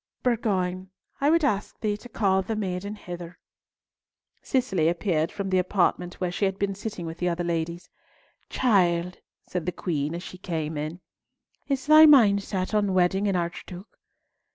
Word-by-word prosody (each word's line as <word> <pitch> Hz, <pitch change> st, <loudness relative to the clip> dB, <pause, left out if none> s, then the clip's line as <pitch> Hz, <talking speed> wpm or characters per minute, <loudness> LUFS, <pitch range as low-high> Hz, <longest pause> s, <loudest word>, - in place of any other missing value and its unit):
Bourgoin, 190 Hz, -6 st, 0 dB, 0.3 s
I 280 Hz, -, +3 dB
would 330 Hz, 0 st, +3 dB
ask 210 Hz, -8 st, -1 dB
thee 210 Hz, -2 st, 0 dB
to 245 Hz, -, -13 dB
call 195 Hz, -4 st, +2 dB
the 220 Hz, +4 st, -3 dB
maiden 200 Hz, 0 st, -3 dB
hither." 175 Hz, -3 st, -8 dB, 1.0 s
Cicely 195 Hz, -11 st, +1 dB
appeared 170 Hz, -2 st, 0 dB
from 195 Hz, -2 st, -4 dB
the 185 Hz, -, +3 dB
apartment 180 Hz, -1 st, 0 dB
where 180 Hz, -1 st, -2 dB
she 200 Hz, -, 0 dB
had 195 Hz, 0 st, -1 dB
been 200 Hz, 0 st, -1 dB
sitting 200 Hz, -2 st, -6 dB
with 165 Hz, 0 st, -7 dB
the 180 Hz, -, +1 dB
other 175 Hz, 0 st, -2 dB
ladies. 170 Hz, 0 st, -3 dB, 0.6 s
"Child," 180 Hz, -7 st, +1 dB, 0.3 s
said 180 Hz, -2 st, -4 dB
the -, -, +1 dB
Queen, 155 Hz, -3 st, -2 dB
as 175 Hz, -, -6 dB
she 185 Hz, -, -10 dB
came 160 Hz, -4 st, -3 dB
in, 155 Hz, +4 st, -5 dB, 0.7 s
"is 275 Hz, -2 st, -1 dB
thy 310 Hz, +1 st, +8 dB
mind 220 Hz, -9 st, +6 dB
set 190 Hz, 0 st, -3 dB
on 205 Hz, -3 st, +1 dB
wedding 190 Hz, +3 st, +2 dB
an 195 Hz, -, +1 dB
archduke?" 175 Hz, +2 st, -5 dB
185 Hz, 165 wpm, -26 LUFS, 175-210 Hz, 1.0 s, thy